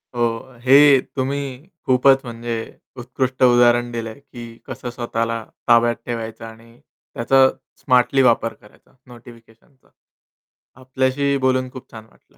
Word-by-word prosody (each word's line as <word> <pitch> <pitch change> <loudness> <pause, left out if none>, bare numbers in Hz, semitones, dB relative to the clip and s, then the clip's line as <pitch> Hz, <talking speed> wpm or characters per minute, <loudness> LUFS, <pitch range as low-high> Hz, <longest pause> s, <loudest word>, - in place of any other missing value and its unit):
हो. 120 +2 -2
हे 135 +1 +6
तुम्ही 140 +2 -4 0.2
खूपच 135 +1 +4
म्हणजे 120 -1 -5 0.4
उत्कृष्ट 130 +1 -3
उदाहरण 120 -1 +4
दिलंय, 115 +1 -6
की 120 -4 -12
कसं 125 - -7
स्वतःला 115 -1 -3 0.2
ताब्यात 120 0 +4
ठेवायचं 115 -1 -6
आणि 115 +1 -15
त्याचा 130 +3 +1 0.3
स्मार्टली 125 +2 +2
वापर 115 -2 +2
करायचा 105 - -24
नोटिफिकेशनचा. 120 +2 -18 0.9
आपल्याशीही 130 +2 -1
बोलून 130 0 0
खूप 130 0 -12
छान 110 -1 -11
वाटलं. - - -30
120 Hz, 115 wpm, -20 LUFS, 115-130 Hz, 0.9 s, हे